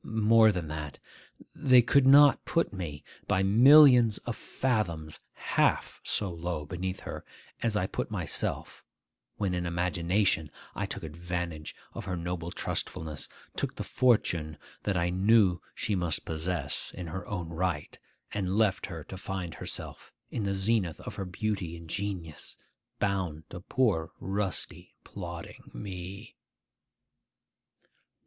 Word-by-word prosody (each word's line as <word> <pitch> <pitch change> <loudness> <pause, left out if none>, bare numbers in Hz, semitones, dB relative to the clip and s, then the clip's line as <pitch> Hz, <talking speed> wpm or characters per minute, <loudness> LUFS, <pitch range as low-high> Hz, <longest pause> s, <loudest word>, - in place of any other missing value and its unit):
More 110 0 +5
than 90 -5 -3
that. 75 -2 -5 0.6
They 125 -2 +6
could 135 +2 +4
not 140 +1 +8
put 165 -8 0
me, 80 -7 -5 0.2
by 95 - +2
millions 125 +1 +8
of 120 - -2
fathoms, 85 - -2
half - - +1
so 100 -3 -1
low 85 -2 -3
beneath 90 +4 -4
her - - -6 0.4
as 115 -2 +1
I 95 - +2
put - - -3
myself - - -2 0.5
when 100 -3 0
in 90 -1 -1
imagination 90 0 +1 0.2
I - - -2
took - - -6
advantage 85 0 -4 0.2
of - - -6
her 95 -2 -2
noble 85 0 -3
trustfulness, 80 -3 -4 0.3
took - - -2
the - - -4
fortune 85 -11 +2 0.2
that 100 -3 0
I 85 0 +1
knew 95 -2 +4
she 105 - -1
must 90 -4 -1
possess 80 -2 -2
in 90 - -5
her 90 +2 -6
own 90 -5 -4
right, 85 -2 -2 0.3
and 95 -1 -1
left 105 -4 +2
her 80 -5 -7
to 95 - -8
find 95 -3 -4
herself, - - -6 0.2
in 110 - -2
the 100 0 0
zenith 95 -4 0
of - - -7
her 95 - -4
beauty 90 -2 -3
and 85 0 -11
genius, 90 -4 -4 0.4
bound 95 -6 -1
to - - -6
poor 90 -6 +1
rusty, 95 0 -4
plodding 85 -3 -8
me. 95 +2 -7
90 Hz, 135 wpm, -29 LUFS, 85-105 Hz, 0.6 s, not